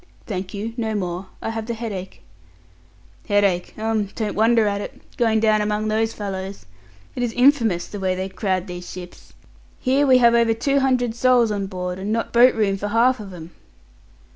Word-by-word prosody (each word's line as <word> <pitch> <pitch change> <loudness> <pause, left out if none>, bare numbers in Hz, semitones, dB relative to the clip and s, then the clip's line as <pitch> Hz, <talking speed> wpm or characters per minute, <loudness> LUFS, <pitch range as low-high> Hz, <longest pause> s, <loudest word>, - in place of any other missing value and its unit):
"Thank 185 -3 -4
you, 220 +3 -4
no 220 -2 -2
more. 180 -1 -3 0.2
I 225 - -2
have 225 -1 -5
the 235 - -2
headache." 205 -5 -6 1.0
"Headache 200 -3 +1
um 220 -1 0
don't 215 -2 -2
wonder 225 +1 +3
at 200 -1 -1
it, - - -8 0.2
going 225 -2 +2
down 215 -1 +3
among 210 +1 -1
those 220 +1 +1
fellows. 195 -2 -6 0.5
It - - -3
is 240 -2 -1
infamous 245 -9 +3
the 205 - -8
way 185 -1 0
they 185 +1 -3
crowd 190 -1 -2
these 180 -2 -8
ships. 180 -1 -11 0.5
Here 275 +3 +2
we 260 -1 +7
have 235 -1 +5
over 230 -1 +3
two 280 +4 +1
hundred 255 -3 +1
souls 240 -1 +3
on 200 -2 -2
board, 180 -1 -4
and 200 +2 -3
not 230 +1 -2
boat 245 +2 +6
room 200 -3 +1
for 205 - -3
half 235 +4 +3
of 200 -2 -8
'em." 170 -1 -10
215 Hz, 190 wpm, -22 LUFS, 190-230 Hz, 1.0 s, we